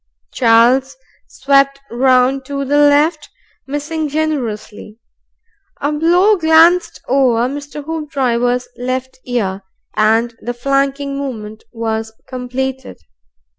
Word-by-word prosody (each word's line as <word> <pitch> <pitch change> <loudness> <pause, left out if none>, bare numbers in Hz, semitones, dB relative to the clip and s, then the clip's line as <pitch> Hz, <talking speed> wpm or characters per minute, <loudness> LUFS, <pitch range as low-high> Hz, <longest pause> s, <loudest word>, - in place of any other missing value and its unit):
Charles 240 - +3 0.3
swept 275 0 +2
round 255 +2 +2
to 275 0 -4
the 290 +2 +2
left, 295 +2 +3 0.4
missing 300 +2 -3
generously. 235 -9 -4 0.8
A 285 - -1
blow 350 +7 +3
glanced 330 +2 +4
over 250 -3 +2
Mr. 285 +1 -7
Hoopdriver's 255 -6 -1
left 255 +1 -4
ear, 200 -6 -2 0.3
and 225 +2 +2
the 245 0 -4
flanking 275 +2 -1
movement 220 -6 -7
was 225 -1 -3
completed. 260 +1 -5
265 Hz, 95 wpm, -16 LUFS, 240-290 Hz, 0.8 s, glanced